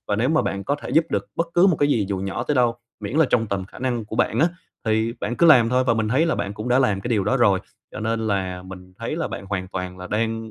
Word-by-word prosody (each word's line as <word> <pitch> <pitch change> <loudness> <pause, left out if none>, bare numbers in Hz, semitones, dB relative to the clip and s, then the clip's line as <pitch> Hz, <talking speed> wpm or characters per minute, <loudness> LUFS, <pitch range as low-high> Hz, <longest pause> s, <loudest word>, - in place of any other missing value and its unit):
Và 105 - +1
nếu 120 +4 +1
mà 155 +1 +3
bạn 100 0 -3
có 145 - 0
thể - - -6
giúp 160 - +4
được - - -1
bất 170 - +1
cứ 175 +2 +6
một 180 -5 +3
cái 145 - +2
gì 110 -8 +1
dù 100 - -2
nhỏ 95 +4 -3
tới 150 - -1
đâu, 120 -3 +2 0.2
miễn 105 +6 -4
là 160 -2 +5
trong 115 -2 +2
tầm 100 -2 -2
khả 95 - -14
năng 120 -3 -2
của 105 - -7
bạn 115 - +1
á, 165 - +5 0.4
thì 110 +1 +1
bạn 120 - -2
cứ 170 - +4
làm 125 -8 +7
thôi 125 +1 +2
và 115 - +2
mình 110 -1 0
thấy 140 +8 +2
là 165 - +1
bạn 100 -1 -3
cũng 110 +4 -5
đã 125 +1 +4
làm 105 -7 +2
cái 120 - -5
điều 105 -5 +1
đó 130 +6 +2
rồi. 100 -6 +3 0.3
Cho - - -6
nên 110 0 -1
là 95 -3 -2
mình 90 0 -11
thấy - - -3
là - - -2
bạn 95 - -7
hoàn 95 -2 -3
toàn 90 -1 -5
là 90 - -7
đang 110 +2 -2
110 Hz, 310 wpm, -23 LUFS, 100-125 Hz, 0.4 s, làm